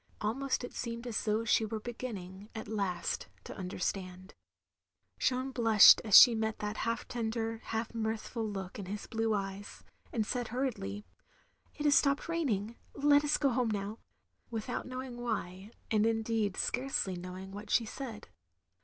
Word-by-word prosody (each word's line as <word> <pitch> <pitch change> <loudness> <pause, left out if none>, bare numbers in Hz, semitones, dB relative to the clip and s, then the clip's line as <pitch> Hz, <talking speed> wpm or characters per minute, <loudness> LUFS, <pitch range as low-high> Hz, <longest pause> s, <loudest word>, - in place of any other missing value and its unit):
Almost 255 +6 -1
it 245 - -6
seemed 235 0 -5
as 235 -3 -2
though 215 +1 +1
she 225 - +3
were 220 0 -3
beginning, 210 -4 -7
at 220 - -6
last, 195 -5 -2 0.2
to - - -8
understand. 185 0 -4 0.9
Jeanne 260 +1 0
blushed 225 -4 +8
as 215 -3 +8
she 245 - +10
met 220 -1 -1
that 210 +1 -4
half 230 0 -2
tender, 225 -1 -2
half 225 +1 -3
mirthful 225 +1 -3
look 195 -1 -6
in 195 - -6
his 205 +2 -5
blue 225 -1 0
eyes, 195 0 -5 0.3
and 220 -3 0
said 245 +1 -2
hurriedly, 215 - -3 0.7
"It 300 - -4
has 290 - +5
stopped 280 0 +3
raining, 235 -10 -1 0.2
let 290 +1 +4
us 295 0 +2
go 280 - +2
home 245 -2 +1
now," 210 +1 -3 0.5
without 230 +2 -4
knowing 255 -1 -6
why; 200 -4 -3 0.2
and 215 -1 +3
indeed 225 -3 0
scarcely 250 -7 -1
knowing 185 +2 -7
what 205 +2 -8
she 230 - +3
said. 225 -2 -7
225 Hz, 155 wpm, -32 LUFS, 205-245 Hz, 0.9 s, she